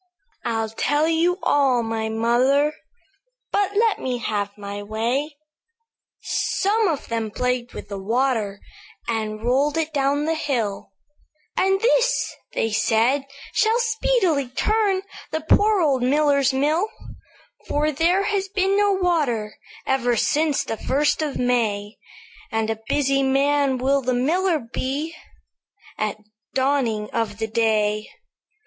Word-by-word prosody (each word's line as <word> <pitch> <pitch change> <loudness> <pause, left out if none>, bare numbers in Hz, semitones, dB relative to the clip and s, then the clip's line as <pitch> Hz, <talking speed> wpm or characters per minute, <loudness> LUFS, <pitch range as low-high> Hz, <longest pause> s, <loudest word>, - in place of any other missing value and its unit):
"I'll 225 -2 -1
tell 290 +7 +1
you 335 +2 +2
all, 265 -4 +3
my 225 -1 -2
mother; 250 +6 +2 0.8
But 405 0 0
let 445 0 +2
me 255 -1 -2
have 205 -3 -3
my 200 0 -6
way. 240 +8 -2 0.9
"Some 425 +2 +1
of 310 -6 -2
them 225 -2 -2
played 250 +2 -2
with - - -8
the 200 -1 -5
water, 220 -1 0 0.5
And 215 -2 -3
rolled 275 +6 +2
it 320 -1 -1
down 285 +1 +1
the 325 - +1
hill; 240 -10 -2 0.7
'And 385 +1 +2
this,' - - +2 0.2
they 225 - 0
said, 235 +6 +2 0.3
'shall 445 +1 +3
speedily 450 - +1
turn 395 - +1 0.3
The 315 - -2
poor 410 +5 +3
old 275 -6 +2
miller's 280 +1 +3
mill; 300 +9 +1 0.8
"'For 300 +1 +1
there 340 +7 +2
has 400 -2 -1
been 390 0 +1
no 410 0 +3
water 300 - 0 0.3
Ever 245 -3 +1
since 300 +3 +1
the 225 - -4
first 290 +6 +1
of 300 -3 -2
May; 220 -4 0 0.6
And 225 0 0
a 220 - -4
busy 275 -1 +2
man 275 0 +2
will 275 +2 +1
the 255 -1 0
miller 335 +7 +1
be 275 +5 -4 0.8
At 215 -1 -2 0.4
dawning 260 -6 0
of 220 -3 -2
the 220 - -1
day. 215 -2 0
270 Hz, 130 wpm, -23 LUFS, 225-320 Hz, 0.9 s, all